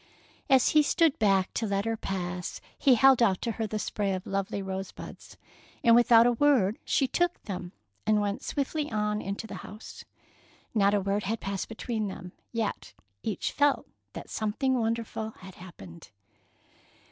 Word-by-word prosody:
As 265 -2 +5
he 305 - +5
stood 315 +1 +2
back 195 -3 +2
to 225 - -1
let 200 0 -1
her 225 0 0
pass, 180 -4 -4 0.2
he 265 -3 +4
held 265 +1 +6
out 195 -5 +3
to 235 - 0
her 225 0 -3
the 215 - -3
spray 205 -1 -1
of 185 -1 -4
lovely 195 +1 -2
rosebuds, 190 -1 -7 0.5
and 235 -2 +6
without 235 -1 +6
a 245 - +5
word 240 -5 +3
she 270 - +1
took 350 +5 0
them 185 -4 -6 0.4
and 215 -1 +4
went 205 0 -2
swiftly 295 +1 -2
on 210 -1 0
into 200 +3 -4
the - - -7
house. 210 +2 -10 0.7
Not 205 -2 +3
a 205 - +1
word 200 +1 -1
had 225 +3 -1
passed 195 -1 -4
between 225 -1 -3
them, 180 -2 -8 0.2
yet 225 -3 -3 0.3
each 210 -5 -2
felt 290 -1 +2 0.3
that - - -9
something 245 +5 0
wonderful 225 -1 -2
had 190 0 -11
happened. 95 - -12
215 Hz, 165 wpm, -28 LUFS, 195-240 Hz, 0.7 s, held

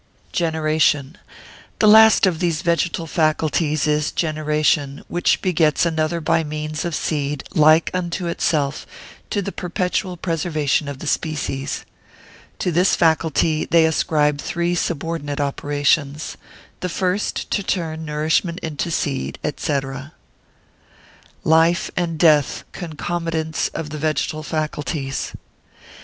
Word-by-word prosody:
Generation.] 155 -3 +1 0.6
The 215 - +4
last 220 0 +7
of 175 -4 +1
these 170 -3 0
vegetal 170 0 0
faculties 155 -1 +1
is 150 0 +1
generation, 150 -3 0
which 175 +1 +1
begets 165 -4 +2
another 160 0 0
by 160 +1 +1
means 155 +1 -4
of 170 -2 -2
seed, 145 -3 -2
like 155 +1 +5
unto 180 0 -2
itself, 150 -4 -1 0.4
to 205 - -1
the 200 - -4
perpetual 180 +1 -2
preservation 155 -4 0
of 140 -1 -5
the 150 - -8
species. 145 -3 -2 0.7
To 180 - -1
this 180 +3 +3
faculty 160 -1 +2
they 165 -1 +4
ascribe 150 -2 +1
three 170 +1 -1
subordinate 165 -3 -2
operations:—the 145 +4 -2
first 185 +3 -1
to - - +1
turn 165 -5 -2
nourishment 155 +3 0
into 160 +1 -3
seed, 145 -4 -2 0.2
&c. 145 -2 0 1.6
Life 165 +2 +3
and 170 -2 -1
Death 150 -4 +3
concomitants 165 -1 -3
of 150 -2 -4
the 155 - -5
Vegetal 155 0 -1
Faculties. 150 -3 -3
160 Hz, 115 wpm, -21 LUFS, 150-170 Hz, 1.6 s, last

